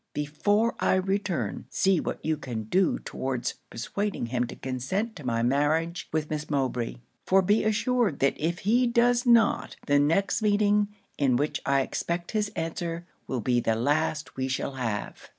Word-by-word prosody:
Before 205 +10 +1
I - - +3
return, 190 -1 -1
see 190 -3 +2
what - - -4
you 160 0 +2
can 120 -6 -5
do 180 - +2
towards 130 -2 -3 0.2
persuading 200 - -3
him 120 +1 -1
to - - -8
consent 135 - -3
to 150 - -9
my 115 -2 0
marriage 155 +6 +1
with 155 -1 -1
Miss 150 0 -3
Mowbray; 130 - -1 0.3
for 190 0 +5
be 205 +4 +3
assured 220 - +1
that 140 - +2
if 165 +3 0
he 240 +4 +4
does 240 +1 +3
not, 235 -2 +4
the 145 -1 +4
next 180 +8 +2
meeting, 205 0 +3 0.3
in 135 -4 +3
which 145 +4 -1
I 140 0 +4
expect 170 +5 -3
his 210 -1 0
answer, 165 +1 -3 0.2
will 130 -3 -2
be 120 +2 +2
the 115 -1 +1
last 150 +5 0
we 130 0 -1
shall 130 +1 -2
have.' 120 -6 -4
160 Hz, 170 wpm, -27 LUFS, 130-205 Hz, 0.3 s, for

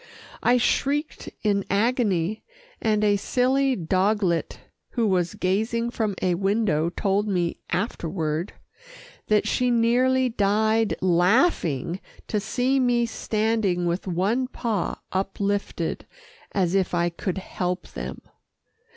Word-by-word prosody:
I 245 +1 +4
shrieked 285 +5 0
in 200 -2 +2
agony, 210 -3 +1 0.4
and 215 -1 +1
a 205 -1 +4
silly 260 +5 +1
doglet 185 0 0 0.4
who 235 -3 +1
was 180 -4 +1
gazing 220 +5 0
from 215 -4 -1
a 180 - +2
window 195 -4 +1
told 200 +3 0
me 175 -4 0
afterward 170 -4 -2 0.7
that 215 -1 +2
she 250 0 +1
nearly 250 +2 +3
died 220 0 +2
laughing 180 - +2 0.3
to 210 - +1
see 250 +6 0
me 245 -2 +2
standing 215 -5 0
with 175 +3 -2
one 200 +9 0
paw 225 -7 -2 0.2
uplifted 200 +1 -2 0.4
as 185 -3 +1
if 190 -2 +1
I 175 0 +2
could 185 +2 -3
help 180 -1 -3
them. - - -7
205 Hz, 115 wpm, -25 LUFS, 180-235 Hz, 0.7 s, I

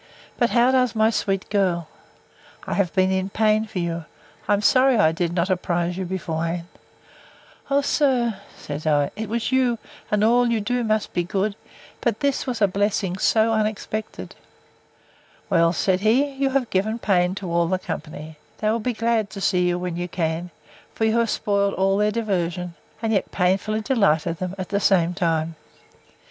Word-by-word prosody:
But 240 - +3
how 245 +1 +4
does 250 -3 +2
my 220 +1 +3
sweet 195 -3 -1
girl? 180 -5 +1 0.8
I - - -3
have 190 -4 +1
been 185 0 +3
in 190 0 -1
pain 215 +1 +2
for 215 -3 -8
you—I 170 +1 -4
am 205 +1 0
sorry 260 +1 +4
I 180 -7 +4
did 170 +1 -1
not 175 +2 0
apprise 175 -1 -1
you 190 0 -3
beforehand. 170 -2 -3 1.0
O 280 0 +3
sir, 250 -7 +1 0.2
said 145 +2 -6
I, 145 -2 +2
it 220 -1 -5
was 235 +2 -1
you; 255 -2 +2 0.3
and 210 0 +1
all 240 +2 +4
you 230 -1 +1
do 245 +4 -1
must 215 -1 -1
be 175 - 0
good—But 200 +4 -4
this 280 -2 0
was 235 -4 -1
a - - +6
blessing 195 -1 -1
so 225 +2 +3
unexpected!—— 215 0 -3 1.2
Well, 170 -2 +4
said 185 +2 +1
he, 255 +8 +2
you 270 0 0
have 265 -3 -1
given 210 +4 0
pain 185 -4 +1
to 190 -3 -5
all 170 0 +2
the 185 +2 +1
company. 155 -3 -7 0.2
They 215 0 0
will 230 - 0
be 245 +3 -2
glad 225 -2 0
to 195 - -8
see 180 -2 +2
you, 175 0 +1
when 180 -1 -4
you 175 0 -3
can: 165 0 -2 0.5
for 220 - 0
you 220 +1 +2
have 230 -1 +1
spoiled 200 -1 0
all 195 +1 +2
their 210 +1 +2
diversion; 180 -5 -2 0.3
and 225 0 +1
yet 195 - 0
painfully 195 +4 0
delighted 175 - +1
them 185 0 -4
at 185 -2 -5
the 200 - 0
same 180 -4 +3
time. 165 -3 -1
200 Hz, 180 wpm, -23 LUFS, 175-220 Hz, 1.2 s, a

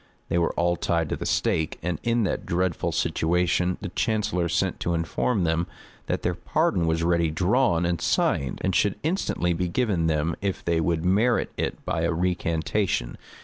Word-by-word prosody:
They 85 - +2
were 85 - +1
all 85 0 +1
tied 85 -2 0
to - - -1
the - - -4
stake; 80 0 0
and 85 -2 -2
in 120 -1 +1
that 95 - -1
dreadful 90 -1 0
situation 90 +2 +1
the 100 - -4
chancellor 105 -4 0
sent 90 +2 0
to 85 - 0
inform 90 +6 0
them, 85 +1 +1 0.4
that - - -2
their - - +1
pardon 85 -2 0
was 80 0 +1
ready 85 -1 +2
drawn 90 +2 +2
and 85 -1 -1
signed, 70 -2 0
and 95 - +1
should 100 +2 +2
instantly 155 - 0
be 90 +2 -1
given 95 -4 0
them 80 +1 0
if 100 -1 -3
they 85 -1 +1
would 80 +1 0
merit 110 +6 +2
it - - -3
by - - -1
a - - +1
recantation. 85 - -1
85 Hz, 180 wpm, -25 LUFS, 85-95 Hz, 0.4 s, They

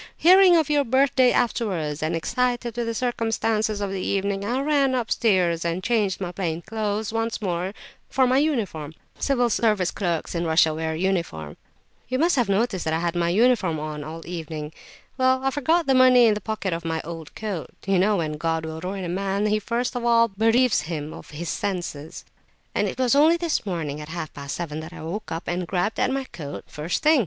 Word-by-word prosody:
Hearing 365 0 +7
of 315 -3 +2
your 295 -1 +2
birthday 260 0 +3
afterwards, 185 -11 -1
and 155 +2 0
excited 240 +6 -1
with 240 -1 -2
the 230 - -1
circumstances 225 -3 0
of 200 -1 -2
the 195 -1 -3
evening, 200 +1 -1
I 240 +6 -1
ran 280 -2 +2
upstairs 190 -8 +1
and 170 +2 -2
changed 210 -5 +1
my 180 -2 -3
plain 170 -2 -3
clothes 215 0 -2
once 225 0 -1
more 185 -1 -2 0.4
for 260 0 +3
my 255 +2 +3
uniform 200 - -1 0.2
[Civil 250 -3 +2
Service 210 -6 +2
clerks 175 -5 -2
in 170 -1 -1
Russia 160 -1 +3
wear 160 0 -2
uniform.]—you 170 - -4
must 335 +4 +3
have 245 -6 +1
noticed 200 -4 0
I 160 0 +1
had 170 0 -1
my 170 -1 +1
uniform 205 -4 +3
on 150 -1 -5
all 160 +2 -7
the 170 - -9
evening? 155 -3 -5 0.5
Well, 260 0 +3
I 270 - +1
forgot 315 +5 +1
the 270 - +3
money 255 -1 +7
in 220 - +5
the 210 - -4
pocket 205 -3 -3
of 165 0 -4
my 165 -1 -2
old 165 -1 -8
coat—you 195 -1 -2
know 205 +2 +3
when 155 -3 -2
God 160 0 -1
will 160 0 -6
ruin 190 +2 -4
a - - -3
man 195 +3 -1
he 215 0 +2
first 235 +4 -2
of 245 - -3
all 230 -1 +4
bereaves 225 - +3
him 155 -2 -4
of - - -11
his 155 +2 -6
senses—and 175 -6 -5
it - - -5
was 255 -1 +2
only 310 +4 +5
this 335 -10 -1
morning 155 -5 -3
at 150 - -9
half 160 -2 -5
past 140 -1 -6
seven 155 -3 -4
that 160 +2 -8
I - - -9
woke 190 +7 -5
up 165 +1 -3
and 175 0 -2
grabbed 190 +5 -1
at - - +2
my 270 +1 -1
coat 150 - -8
pocket, - - -27
first 155 +4 -3
thing. 310 -1 +5
195 Hz, 205 wpm, -24 LUFS, 165-240 Hz, 0.5 s, Hearing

